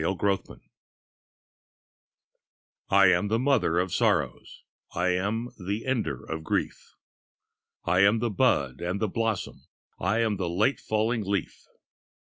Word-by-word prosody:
THE 95 +4 0
PARADOX 95 0 -2 2.3
I 100 0 +6
am 90 +3 +1
the 110 +2 +1
mother 130 -10 +2
of 90 0 0
sorrows, 90 - -1 0.3
I 90 +1 +1
am 100 +6 -1
the 100 +4 -4
ender 110 - -2
of 80 0 -5
grief; - - -3 0.9
I 90 +2 +2
am 100 +3 +5
the 115 0 -1
bud 70 - +1
and 90 +3 -2
the 110 - 0
blossom, 115 -1 -3 0.3
I 110 +1 +1
am 110 -3 0
the 90 -3 -2
late 105 +10 +1
falling 110 +1 -1
leaf. 100 0 -3
100 Hz, 130 wpm, -27 LUFS, 90-115 Hz, 2.3 s, I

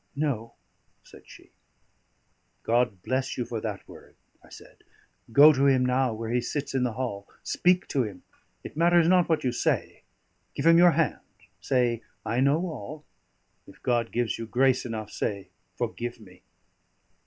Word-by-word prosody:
"No," 135 -6 -2 0.5
said - - -17
she. - - -16 1.1
"God 120 -5 0
bless 130 +1 -2
you 125 - -2
for 115 -2 -5
that 105 -3 -5
word!" - - -15 0.3
I - - -19
said. - - -14 0.5
"Go 145 +6 +8
to 140 0 +2
him 130 -2 +3
now, 125 0 +1
where 110 +1 -5
he 125 0 +1
sits 140 +4 -4
in 135 - 0
the 125 -2 0
hall; 110 -5 -4 0.2
speak 180 0 +1
to 135 - +1
him 105 -6 -6 0.4
it - - -9
matters 170 +1 +4
not 180 -1 +4
what 160 -2 +1
you 125 - +1
say; 120 - -1 0.5
give 140 - -3
him 165 0 +7
your 175 -1 +6
hand; 165 -2 0 0.4
say, 120 0 0 0.2
'I 115 +3 -1
know 140 +5 +3
all'; 150 - -8 0.6
if - - -16
God 120 -2 0
gives 120 -1 -1
you 115 - -5
grace 130 +1 +2
enough, 110 -3 -6
say, 100 -2 -4 0.3
'Forgive 120 0 -4
me.'" 90 -4 -17
125 Hz, 165 wpm, -26 LUFS, 115-145 Hz, 1.1 s, Go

